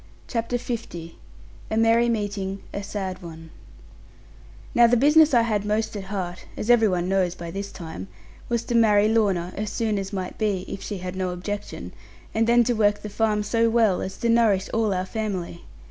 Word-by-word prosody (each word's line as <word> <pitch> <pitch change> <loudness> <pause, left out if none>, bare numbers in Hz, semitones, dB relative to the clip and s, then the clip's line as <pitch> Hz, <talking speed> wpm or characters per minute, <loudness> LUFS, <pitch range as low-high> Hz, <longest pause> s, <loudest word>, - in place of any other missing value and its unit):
CHAPTER 235 0 -1
L 225 -9 -5 0.6
A 220 - -1
MERRY 230 +1 +4
MEETING 200 -3 -2
A 200 - -3
SAD 195 -2 -5
ONE 165 -2 -10 1.2
Now 240 0 +6
the 245 +1 +3
business 300 +4 +6
I 240 -3 +5
had 215 -3 0
most 215 +1 -1
at 200 -2 -5
heart 185 -3 -5
(as 230 - +1
every 225 -2 +5
one 180 -2 0
knows 185 -2 +1
by 170 -2 -7
this 200 +2 -5
time) 160 - -8 0.4
was 235 -1 0
to - - -4
marry 215 -3 +5
Lorna 195 -6 +1
as 210 0 -3
soon 215 -2 -1
as 195 0 -5
might 185 -3 -5
be, 200 -4 0
if - - -6
she 205 - -4
had 180 0 -6
no 185 -1 -1
objection, 195 +3 -5 0.4
and 225 +1 +2
then 240 0 +5
to 245 - +1
work 210 -2 +2
the 210 - -5
farm 210 0 +1
so 230 +2 +2
well, 225 -5 +3
as 190 - -5
to 235 - -1
nourish 220 -5 +3
all 225 -2 +1
our 185 -1 -1
family. 190 -5 -4
210 Hz, 190 wpm, -24 LUFS, 185-225 Hz, 1.2 s, Now